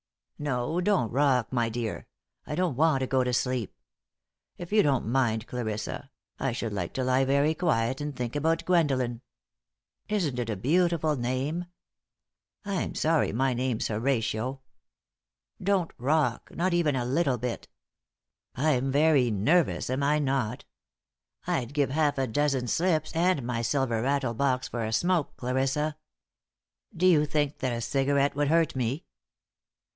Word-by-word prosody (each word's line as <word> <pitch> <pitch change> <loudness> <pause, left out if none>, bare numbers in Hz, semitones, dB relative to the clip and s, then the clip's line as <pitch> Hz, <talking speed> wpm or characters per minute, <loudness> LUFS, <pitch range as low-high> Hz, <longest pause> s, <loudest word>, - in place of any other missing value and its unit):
No, 145 +3 -1
don't 180 - +1
rock, 130 -3 +2
my 120 -2 +1
dear. 115 -1 -4 0.4
I 150 - -3
don't 180 -6 0
want 150 -1 +3
to - - +1
go 130 0 +1
to 125 - -1
sleep. 125 -3 -1 0.8
If 175 +1 -8
you 215 0 +5
don't 140 -6 +1
mind, 115 -2 +1
Clarissa, 120 +2 -4 0.3
I 135 - 0
should 115 -3 -3
like 90 -4 -3
to 130 - -1
lie 130 +1 +2
very 140 +3 +2
quiet 130 -7 0
and 145 -1 -4
think 125 0 -4
about 160 +3 0
Gwendolen. 135 -9 +1 0.9
Isn't 170 -12 0
it 120 -2 -2
a 110 - -1
beautiful 160 - +1
name? 130 +7 -2 1.0
I'm 200 -2 -2
sorry 160 0 +2
my 130 +4 +1
name's 125 -2 -1
Horatio. 115 +2 -1 1.0
Don't 190 -3 0
rock, 130 -2 0
not 180 +1 0
even 165 -5 +2
a 125 -2 -1
little 135 0 +1
bit. 120 0 -4 0.9
I'm 135 -1 +1
very 145 -3 +4
nervous, 130 - +1
am 130 +2 -1
I 145 +2 +3
not? 135 -5 -1 0.8
I'd 125 +4 -2
give 140 -3 +1
half 150 -1 +1
a 135 - +1
dozen 135 +1 0
slips 165 +4 +1
and 170 -4 +2
my 120 -1 -2
silver 120 -1 0
rattlebox 130 0 0
for 120 -1 -4
a 110 - -2
smoke, 175 +3 +1
Clarissa. 135 +4 -1 1.0
Do 180 - +1
you 155 -5 +5
think 145 -1 -1
that 130 -2 -1
a 115 - -3
cigarette 140 +3 +1
would 145 0 +1
hurt 165 0 +2
me?" 130 +5 -2
135 Hz, 150 wpm, -27 LUFS, 125-155 Hz, 1.0 s, you